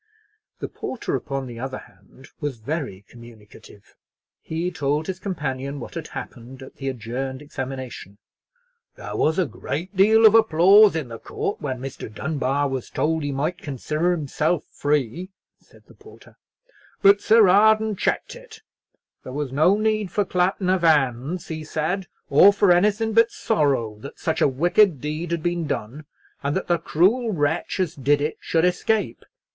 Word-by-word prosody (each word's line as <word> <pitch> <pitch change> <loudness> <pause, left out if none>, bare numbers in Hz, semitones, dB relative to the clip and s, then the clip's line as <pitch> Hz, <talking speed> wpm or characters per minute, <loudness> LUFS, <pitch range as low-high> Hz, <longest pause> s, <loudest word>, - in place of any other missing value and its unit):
The - - -5
porter, 260 - -4
upon 135 -2 -4
the 120 -2 -9
other 130 +1 -4
hand, 135 +1 -17
was 145 -5 -4
very 115 - -5
communicative. 110 -4 -16 0.5
He 165 +3 -3
told 150 -1 -1
his 185 +1 -5
companion 140 -7 -4
what 120 - -9
had 165 -2 -6
happened 130 +2 -9
at 130 - -14
the 135 -1 -3
adjourned 130 +2 -5
examination. 130 -7 -7 0.8
"There - - -7
was 160 +1 +1
a 185 - +2
deal 195 +10 +2
of 215 - +8
applause 205 -1 +6
in 155 -6 -3
the 115 -1 -8
court 200 - -4
when 130 -3 -3
Mr. 130 -4 -7
Dunbar 140 +2 -1
was 135 -3 -4
told 160 +1 -1
he 145 -1 -2
might 150 +7 -2
consider 150 +3 -2
himself 155 0 -1
free," 145 +4 -1 0.3
said - - -22
the - - -18
porter; 425 +1 -17 0.7
"but 200 +1 +6
Sir 220 -2 +5
Arden 215 +3 +4
checked - - -2
it; - - -14 0.6
there 130 - -8
was 145 -2 -3
no 155 +9 +3
need 215 -2 0
for 205 - 0
clapping 185 +1 0
of 185 -1 +1
hands, 145 0 +1
he 160 -1 -5
says, 160 +5 -2 0.2
or 170 +8 +7
for 200 -2 +3
anything 210 +5 +2
but 230 +1 +5
sorrow 135 - 0
that 140 - -10
such 160 -2 -2
a - - +5
wicked 170 +4 +3
deed 155 +4 -4
had 170 -2 -2
been 175 -2 -1
done, 140 +3 -5 0.4
and 140 +1 -1
that 190 - -2
the 175 -1 +1
cruel 220 +9 +2
wretch 160 +1 -1
as 180 -4 0
did 145 +2 +1
it 150 +2 -2
should 165 +1 +1
escape. 180 - 0
155 Hz, 160 wpm, -23 LUFS, 135-185 Hz, 0.8 s, of